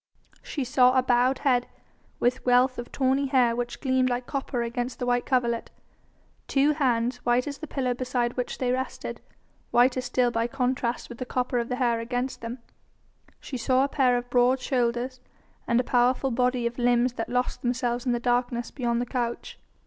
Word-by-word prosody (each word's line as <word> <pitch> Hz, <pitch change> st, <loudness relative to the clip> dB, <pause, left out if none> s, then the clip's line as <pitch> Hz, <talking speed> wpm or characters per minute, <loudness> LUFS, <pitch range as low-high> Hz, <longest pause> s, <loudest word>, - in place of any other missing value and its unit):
She 285 Hz, -, -4 dB
saw 255 Hz, 0 st, +4 dB
a 255 Hz, -, +4 dB
bowed 250 Hz, +1 st, +3 dB
head 250 Hz, -3 st, +3 dB, 0.5 s
with 250 Hz, +2 st, +1 dB
wealth 250 Hz, +1 st, +3 dB
of 240 Hz, -, -7 dB
tawny 270 Hz, +1 st, +1 dB
hair 250 Hz, -3 st, +3 dB
which 240 Hz, 0 st, -4 dB
gleamed 260 Hz, -2 st, +2 dB
like 245 Hz, 0 st, -2 dB
copper 265 Hz, -3 st, -2 dB
against 240 Hz, +1 st, -3 dB
the 245 Hz, -, -3 dB
white 245 Hz, 0 st, 0 dB
coverlet, 235 Hz, -3 st, 0 dB, 0.8 s
two 280 Hz, +2 st, +3 dB
hands 245 Hz, -4 st, +1 dB
white 245 Hz, 0 st, +1 dB
as 285 Hz, -1 st, -6 dB
the 315 Hz, -, -7 dB
pillow 255 Hz, -3 st, -1 dB
beside 245 Hz, -1 st, -1 dB
which 250 Hz, -1 st, -3 dB
they 250 Hz, -1 st, 0 dB
rested, 260 Hz, +1 st, -4 dB, 0.5 s
whiter 250 Hz, +1 st, +3 dB
still 250 Hz, -1 st, +1 dB
by 230 Hz, 0 st, 0 dB
contrast 250 Hz, -1 st, -1 dB
with 240 Hz, -, -10 dB
the 255 Hz, -, -3 dB
copper 250 Hz, -1 st, -1 dB
of 235 Hz, -, -3 dB
the 250 Hz, -, -1 dB
hair 240 Hz, -2 st, +1 dB
against 245 Hz, +3 st, -3 dB
them; 230 Hz, +2 st, -5 dB, 0.8 s
she 260 Hz, -, -6 dB
saw 255 Hz, +2 st, +2 dB
a -, -, +2 dB
pair 255 Hz, -3 st, +2 dB
of 245 Hz, 0 st, -4 dB
broad 250 Hz, +1 st, +4 dB
shoulders, 250 Hz, 0 st, -1 dB, 0.5 s
and 235 Hz, 0 st, +3 dB
a -, -, +2 dB
powerful 250 Hz, +2 st, +2 dB
body 250 Hz, 0 st, +1 dB
and 235 Hz, +1 st, -3 dB
limbs 245 Hz, 0 st, +2 dB
that 225 Hz, -, -4 dB
lost 250 Hz, 0 st, -1 dB
themselves 245 Hz, -1 st, -1 dB
in -, -, +3 dB
the 240 Hz, -, 0 dB
darkness 245 Hz, -1 st, 0 dB
beyond 235 Hz, -3 st, -1 dB
the -, -, -1 dB
couch. 240 Hz, -1 st, -4 dB
250 Hz, 185 wpm, -26 LUFS, 240-255 Hz, 0.8 s, saw